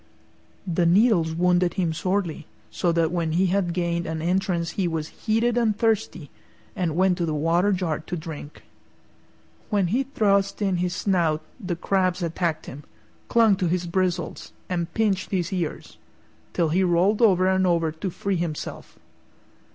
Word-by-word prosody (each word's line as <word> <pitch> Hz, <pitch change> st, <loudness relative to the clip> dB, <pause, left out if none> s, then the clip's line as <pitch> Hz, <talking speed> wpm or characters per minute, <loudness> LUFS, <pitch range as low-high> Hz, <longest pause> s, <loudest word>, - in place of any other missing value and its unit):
The 175 Hz, -2 st, +1 dB
needles 175 Hz, -4 st, +3 dB
wounded 180 Hz, 0 st, +2 dB
him 175 Hz, -4 st, 0 dB
sorely, 175 Hz, -2 st, -2 dB, 0.2 s
so 175 Hz, -, 0 dB
that 165 Hz, -1 st, +1 dB
when 170 Hz, -3 st, -1 dB
he 180 Hz, +3 st, +3 dB
had 195 Hz, -3 st, +1 dB
gained 170 Hz, -1 st, -1 dB
an 160 Hz, 0 st, -3 dB
entrance 175 Hz, 0 st, 0 dB
he 190 Hz, -3 st, -1 dB
was 160 Hz, -2 st, -3 dB
heated 230 Hz, +2 st, 0 dB
and 220 Hz, -3 st, +1 dB
thirsty, 220 Hz, -, -1 dB, 0.4 s
and 170 Hz, -4 st, -1 dB
went 185 Hz, 0 st, +2 dB
to 170 Hz, -, +1 dB
the 155 Hz, -, -1 dB
water 170 Hz, +6 st, +2 dB
jar 180 Hz, -5 st, -1 dB
to 175 Hz, +3 st, -5 dB
drink. 155 Hz, -2 st, -9 dB, 1.1 s
When 200 Hz, -5 st, +1 dB
he 255 Hz, -, +3 dB
thrust 200 Hz, -7 st, +1 dB
in 195 Hz, -3 st, 0 dB
his 180 Hz, 0 st, -1 dB
snout 170 Hz, -6 st, +1 dB, 0.2 s
the 180 Hz, -2 st, -2 dB
crabs 185 Hz, 0 st, 0 dB
attacked 165 Hz, -1 st, -2 dB
him, 145 Hz, +3 st, -9 dB, 0.4 s
clung 225 Hz, -3 st, +4 dB
to 185 Hz, -2 st, 0 dB
his 175 Hz, +1 st, 0 dB
bristles, 180 Hz, -1 st, -2 dB, 0.2 s
and 170 Hz, -2 st, -2 dB
pinched 200 Hz, -4 st, +1 dB
his 185 Hz, -1 st, -1 dB
ears, 175 Hz, -4 st, -4 dB, 0.5 s
till 170 Hz, -2 st, +1 dB
he 185 Hz, +5 st, +2 dB
rolled 185 Hz, +5 st, +2 dB
over 185 Hz, -5 st, +5 dB
and 190 Hz, 0 st, +2 dB
over 165 Hz, -2 st, +1 dB
to 160 Hz, +5 st, -4 dB
free 190 Hz, +2 st, -2 dB
himself. 165 Hz, -3 st, -5 dB
180 Hz, 160 wpm, -24 LUFS, 165-195 Hz, 1.1 s, over